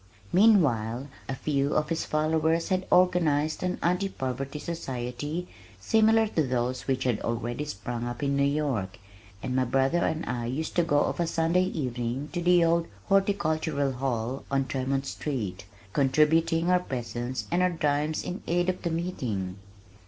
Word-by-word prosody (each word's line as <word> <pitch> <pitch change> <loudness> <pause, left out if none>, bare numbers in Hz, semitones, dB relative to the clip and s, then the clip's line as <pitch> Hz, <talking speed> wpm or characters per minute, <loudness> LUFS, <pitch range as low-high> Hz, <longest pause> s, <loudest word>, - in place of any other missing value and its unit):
Meanwhile 140 - +3 0.2
a 135 - -1
few 140 0 0
of 150 0 +1
his 165 - -1
followers 160 +2 +1
had 185 0 0
organized 160 -5 +3
an 180 0 -1
"Anti 180 +3 +1
Poverty 135 -1 -4
Society" 145 +1 -4 0.3
similar 220 - +4
to 165 - +1
those 125 -2 -1
which 130 -1 0
had 120 -4 +1
already 120 +4 -2
sprung 120 -2 -4
up 120 +3 -5
in 140 0 +1
New 140 - +1
York, 140 -9 0 0.5
and 125 - -2
my 130 - +3
brother 135 +6 +2
and 160 -1 -1
I 120 -1 -3
used 145 +6 -3
to 175 - +5
go 145 -3 +2
of - - -1
a 170 - +1
Sunday 165 +3 +2
evening 130 -4 -3
to 175 - -1
the 175 -1 +5
old 165 0 +2 0.2
Horticultural 160 -8 +1
Hall 125 -1 -2
on 135 -1 +1
Tremont 135 +1 -1
Street, 110 -12 -4 0.3
contributing 160 +4 +3
our 180 - +5
presence 125 -4 -4
and 175 +1 +2
our 180 - +4
dimes 150 -2 0
in 180 - -5
aid 175 +1 +1
of 185 - -2
the 170 - -1
meeting. 125 - -3
145 Hz, 160 wpm, -27 LUFS, 130-170 Hz, 0.5 s, to